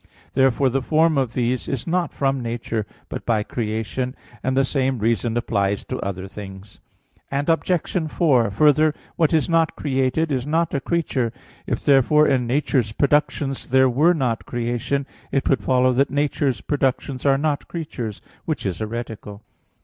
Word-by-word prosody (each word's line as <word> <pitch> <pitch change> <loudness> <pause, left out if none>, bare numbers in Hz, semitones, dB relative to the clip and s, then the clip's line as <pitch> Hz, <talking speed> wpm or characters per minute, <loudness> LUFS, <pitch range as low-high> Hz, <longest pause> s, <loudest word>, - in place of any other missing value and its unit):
Therefore 135 0 +3
the 135 +2 0
form 160 +3 +3
of 130 -4 0
these 125 0 -1
is 135 -4 -3
not 175 +1 0
from 135 -1 0
nature, 115 -2 -3 0.2
but - - -6
by 110 -3 +1
creation; 115 +4 -3 0.3
and 130 0 -1
the 135 - +4
same 135 -1 0
reason 115 +1 0
applies 100 -4 0
to 130 - -4
other 95 -1 -4
things. 95 0 -10 0.5
Obj. 165 +3 0
4: 130 -10 +3
Further, 150 +7 +4 0.2
what 160 -3 +2
is 160 -2 +2
not 165 -1 +2
created, 135 +3 0
is 130 0 -1
not 165 +2 +1
a 140 - +1
creature. 135 -8 -1 0.4
If - - -3
therefore 145 +2 +5
in 125 -2 +1
nature's 125 -3 +1
productions 140 0 0
there 130 0 +4
were 160 +8 +4
not 125 -7 -1
creation, 120 +3 -2 0.3
it 135 0 0
would 135 -6 +2
follow 130 +3 +3
that 135 +3 +2
nature's 140 -2 0
productions 135 -2 -1
are 135 -1 +4
not 145 0 -1
creatures; 125 - -5 0.2
which 155 -8 -3
is 90 -3 -2
heretical. 110 -2 -6
130 Hz, 155 wpm, -22 LUFS, 115-145 Hz, 0.5 s, therefore